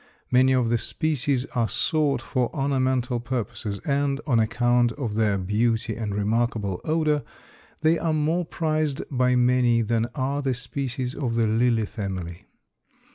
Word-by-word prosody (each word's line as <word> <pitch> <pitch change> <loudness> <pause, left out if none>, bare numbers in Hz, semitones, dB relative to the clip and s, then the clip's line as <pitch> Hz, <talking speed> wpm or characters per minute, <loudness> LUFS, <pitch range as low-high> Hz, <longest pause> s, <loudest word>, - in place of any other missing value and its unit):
Many 130 +1 +5
of 125 -3 +2
the 120 0 +2
species 140 -3 0
are 115 -2 +1
sought 145 -4 0
for 125 -3 -1
ornamental 130 -3 0
purposes 120 -4 -4
and, 140 -1 0
on 125 -7 +2
account 120 +2 +2
of 120 -6 -4
their 105 -2 +1
beauty 110 +4 0
and 105 -3 -3
remarkable 105 -2 -1
odor, 155 -2 +1 0.6
they 160 +1 +3
are 165 - 0
more 155 +3 +1
prized 155 -3 -1
by 125 -1 +2
many 125 -1 +3
than 115 +1 0
are 140 +1 -1
the 135 -2 0
species 125 0 -3
of 120 -6 -2
the 115 -1 +2
Lily 115 0 +2
family. 95 -5 -6
125 Hz, 145 wpm, -25 LUFS, 115-140 Hz, 0.6 s, Many